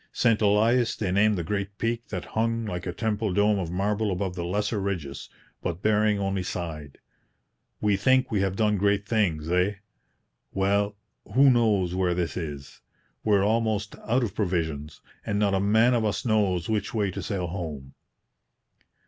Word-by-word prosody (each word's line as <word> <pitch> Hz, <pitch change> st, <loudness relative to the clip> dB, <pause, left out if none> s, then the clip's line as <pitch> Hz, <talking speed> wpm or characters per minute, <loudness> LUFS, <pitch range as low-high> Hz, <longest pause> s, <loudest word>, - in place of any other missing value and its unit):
St 115 Hz, -2 st, +2 dB
Elias 115 Hz, +3 st, +3 dB
they 95 Hz, -4 st, -2 dB
named 105 Hz, +2 st, +3 dB
the 85 Hz, -, -2 dB
great 100 Hz, +3 st, -3 dB
peak 115 Hz, 0 st, -2 dB
that -, -, -5 dB
hung 115 Hz, +1 st, 0 dB
like 90 Hz, -3 st, -4 dB
a -, -, -1 dB
temple 110 Hz, +1 st, -1 dB
dome 105 Hz, +1 st, +3 dB
of 85 Hz, -3 st, -3 dB
marble 105 Hz, +4 st, 0 dB
above 95 Hz, 0 st, -2 dB
the 90 Hz, -1 st, -4 dB
lesser 105 Hz, +4 st, -1 dB
ridges; 90 Hz, -8 st, -4 dB, 0.3 s
but 85 Hz, +2 st, -4 dB
Bering 105 Hz, -1 st, +3 dB
only 95 Hz, -1 st, -1 dB
sighed. 80 Hz, -6 st, -5 dB, 0.8 s
'We 105 Hz, -2 st, +2 dB
think 130 Hz, +4 st, +3 dB
we 105 Hz, -3 st, +1 dB
have 95 Hz, -1 st, 0 dB
done 105 Hz, 0 st, +2 dB
great 100 Hz, +1 st, +1 dB
things, 85 Hz, -8 st, 0 dB
eh? 90 Hz, +3 st, +2 dB, 0.8 s
Well, 100 Hz, +1 st, +1 dB, 0.4 s
who 135 Hz, +1 st, +7 dB
knows 105 Hz, -7 st, +2 dB
where 90 Hz, -1 st, +1 dB
this 85 Hz, -1 st, -2 dB
is? 75 Hz, -5 st, -6 dB, 0.4 s
We're 100 Hz, -2 st, +3 dB
almost 110 Hz, -2 st, 0 dB
out 120 Hz, +3 st, +2 dB
of 105 Hz, -5 st, -3 dB
provisions, 80 Hz, -6 st, -2 dB, 0.2 s
and 100 Hz, -, -2 dB
not 105 Hz, -1 st, +2 dB
a 95 Hz, -, +2 dB
man 110 Hz, +5 st, +4 dB
of 120 Hz, -2 st, +1 dB
us 105 Hz, +5 st, -1 dB
knows 100 Hz, -6 st, +1 dB
which 110 Hz, 0 st, -2 dB
way 100 Hz, -3 st, +1 dB
to -, -, -5 dB
sail 100 Hz, -4 st, -2 dB
home.' 80 Hz, -7 st, -6 dB
100 Hz, 170 wpm, -26 LUFS, 90-110 Hz, 0.8 s, who